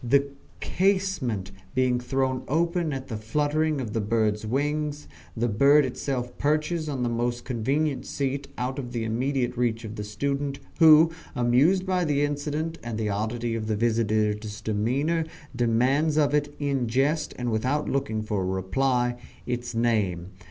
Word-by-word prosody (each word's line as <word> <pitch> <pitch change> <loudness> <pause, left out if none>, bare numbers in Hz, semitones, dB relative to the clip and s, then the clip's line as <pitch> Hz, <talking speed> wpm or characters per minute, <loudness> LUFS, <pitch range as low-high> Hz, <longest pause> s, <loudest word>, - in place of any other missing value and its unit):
The 140 +3 +3 0.3
casement 185 - 0 0.2
being 130 -1 +2
thrown 130 +1 -1
open 170 +2 +1
at 135 -1 -5
the 110 - -4
fluttering 150 +7 0
of 115 -5 -4
the 115 - 0
bird's 110 0 0
wings, 150 +4 -1 0.3
the 120 +2 +1
bird 140 +7 +5
itself 125 -1 -3
perches 155 +2 0
on 135 -4 -2
the - - +1
most 120 +1 -2
convenient 135 +4 -1
seat 140 0 -2
out 130 +3 -2
of 125 -2 -6
the 115 -2 -1
immediate 125 +2 -1
reach 120 -2 0
of 110 +1 -7
the 105 - -3
student, 140 +6 -2 0.2
who 160 0 +8 0.2
amused 135 +10 +3
by 185 -1 +1
the 145 -3 +1
incident 150 +3 -3
and 115 -2 -4
the 110 -1 -1
oddity 115 +3 -2
of 110 -1 -3
the 110 - 0
visitor's 110 -1 0
demeanour, 130 +11 0 0.3
demands 130 +6 +2
of 145 -2 +3
it, 145 0 +1
in 140 -4 0
jest 140 +6 0
and 125 -1 -2
without 130 +7 0
looking 120 -6 -1
for 105 -2 -1
a - - -1
reply, 120 +7 0 0.3
its 120 -1 -3
name. 100 -7 0
125 Hz, 160 wpm, -26 LUFS, 115-145 Hz, 0.3 s, who